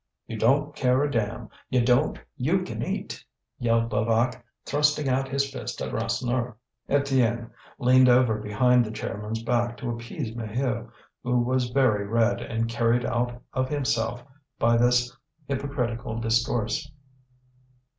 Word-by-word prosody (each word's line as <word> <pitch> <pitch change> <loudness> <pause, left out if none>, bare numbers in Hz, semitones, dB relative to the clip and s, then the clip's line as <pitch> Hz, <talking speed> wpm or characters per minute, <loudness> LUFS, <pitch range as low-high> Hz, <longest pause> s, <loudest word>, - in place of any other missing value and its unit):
"You 115 - -6
don't 140 +7 +2
care 130 +1 +2
a 145 - 0
damn, 110 -1 -2 0.2
you 125 -2 +2
don't! 125 0 +3 0.2
you - - +1
can - - -5
eat!" - - -4 0.4
yelled 115 -1 +1
Levaque, 115 +3 +1 0.2
thrusting 150 0 +2
out 135 +1 0
his 140 +1 +1
fist - - -6
at - - -4
Rasseneur. 125 -2 -1 0.3
Étienne 130 -5 +1 0.3
leaned 130 0 +5
over 120 -3 +4
behind 120 +4 +3
the 110 - -5
chairman's 110 +1 -4
back 120 0 0
to 120 - -3
appease 115 +1 -5
Maheu, 115 +1 -2 0.3
who 125 0 +1
was 125 0 0
very 120 -6 +2
red, 115 +2 +2
and 115 0 -2
carried 115 +1 +1
out 120 0 -1
of 130 0 0
himself 120 -4 -1 0.3
by 115 0 +3
this 125 +1 +3 0.3
hypocritical 130 -5 -3
discourse. 115 -1 0
120 Hz, 135 wpm, -26 LUFS, 115-130 Hz, 0.4 s, leaned